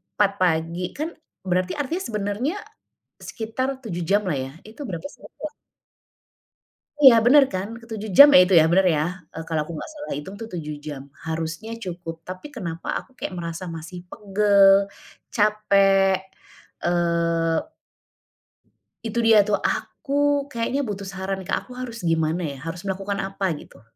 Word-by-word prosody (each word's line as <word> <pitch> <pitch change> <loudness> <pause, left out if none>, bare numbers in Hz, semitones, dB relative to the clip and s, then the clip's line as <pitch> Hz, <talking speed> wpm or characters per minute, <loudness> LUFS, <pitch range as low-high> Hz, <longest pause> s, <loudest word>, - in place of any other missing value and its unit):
4.00 200 -1 +3
pagi, 170 0 0
kan, 310 +4 -3 0.3
berarti 185 0 0
artinya 320 +6 -2
sebenarnya 210 - -2 0.7
sekitar 260 +4 -3
7 180 -9 -5
jam 200 +4 +1
lah 165 - 0
ya, 135 0 -4
itu 225 +7 -10
berapa 190 -3 -5
sih, - - -13
waktunya? 305 -1 -8 1.5
Iya, 265 -4 +10
bener 275 +3 +7
kan? 190 +2 -2
Ke-7 220 -2 -6
jam 285 +1 +12
ya, - - +10
itu 190 - -1
ya, - - +5
benar, 190 +1 +4
ya? 150 - +1 0.3
Eee, 160 - -6
kalau 160 -2 0
aku 170 - -8
enggak 310 - -7
salah 295 0 -6
hitung 170 +7 -7
itu, 225 +1 -7
7 150 -3 -4
jam, 140 -3 -5 0.2
harusnya 160 +7 -4
cukup. 175 -2 -6
Tapi, 185 +9 -7
kenapa 170 -6 -5
aku - - -20
kayak - - -4
merasa 170 +1 -5
masih 165 +3 -8
pegel, 200 -1 +4 0.6
capek, 195 -3 +4 0.7
eee 170 -1 +1 1.3
itu 225 +1 -3
dia 225 -2 +6
tuh. 205 0 0
Aku, 285 0 0
kayaknya 245 +4 -1
butuh 200 -2 -5
saran 190 0 -4
Kak, - - -2
aku 250 - -11
harus 235 -4 -6
gimana 165 +1 +1
ya? - - -11
Harus 170 +4 -6
melakukan 195 +1 -2
apa, 195 -1 -2
gitu? 145 - -13
195 Hz, 155 wpm, -23 LUFS, 170-225 Hz, 1.5 s, jam